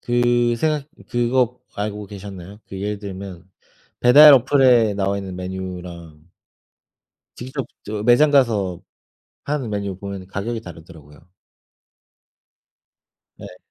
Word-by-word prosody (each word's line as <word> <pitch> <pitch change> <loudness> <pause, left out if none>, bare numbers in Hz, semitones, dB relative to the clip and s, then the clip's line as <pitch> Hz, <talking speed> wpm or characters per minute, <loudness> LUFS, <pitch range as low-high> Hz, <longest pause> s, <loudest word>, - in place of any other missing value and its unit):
그 120 0 +1
생각 150 +1 -1 0.2
그거 120 0 0
알고 105 0 -4
계셨나요? 100 0 -10
그 95 0 -7
예를 105 0 -3
들면 95 -2 -9 0.5
배달 145 +5 +9
어플에 125 -4 +4
나와있는 100 -1 -2
메뉴랑 90 -3 -8 1.1
직접 130 +2 -6 0.2
저 105 0 -5
매장 125 +6 +4
가서 105 - +1 0.6
파는 140 -5 -3
메뉴 100 -2 -3
보면은 100 -1 -7
가격이 110 +4 -4
다르더라고요. 80 -3 -14 2.1
네. - - -11
105 Hz, 230 characters per minute, -21 LUFS, 95-120 Hz, 2.1 s, 배달